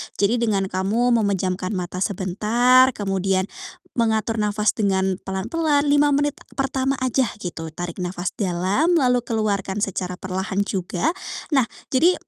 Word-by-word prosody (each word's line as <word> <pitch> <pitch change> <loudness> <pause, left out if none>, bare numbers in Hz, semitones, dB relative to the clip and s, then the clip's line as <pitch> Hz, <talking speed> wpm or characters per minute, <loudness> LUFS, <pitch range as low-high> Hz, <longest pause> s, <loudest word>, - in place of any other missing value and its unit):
Jadi 205 +4 +2
dengan 205 -5 0
kamu 200 +7 +1
memejamkan 190 -2 -1
mata 180 -1 -4
sebentar, 220 +7 +3
kemudian 195 -1 0 0.5
mengatur 225 -1 +1
nafas 210 0 +1
dengan 190 -3 +1
pelan-pelan, 285 +10 0
5 290 0 +4
menit 290 +1 +1 0.2
pertama 270 0 0
aja, 260 0 +2 0.2
gitu. 165 -3 -6
Tarik 175 +1 -5
nafas 180 -1 -3
dalam, 195 - +1
lalu 250 -7 +3
keluarkan 205 -3 -1
secara 180 -2 -2
perlahan 190 +2 -2
juga. 185 -3 -1 0.4
Nah, 270 -5 +3 0.2
jadi 325 +8 +4
205 Hz, 125 wpm, -22 LUFS, 190-250 Hz, 0.5 s, 5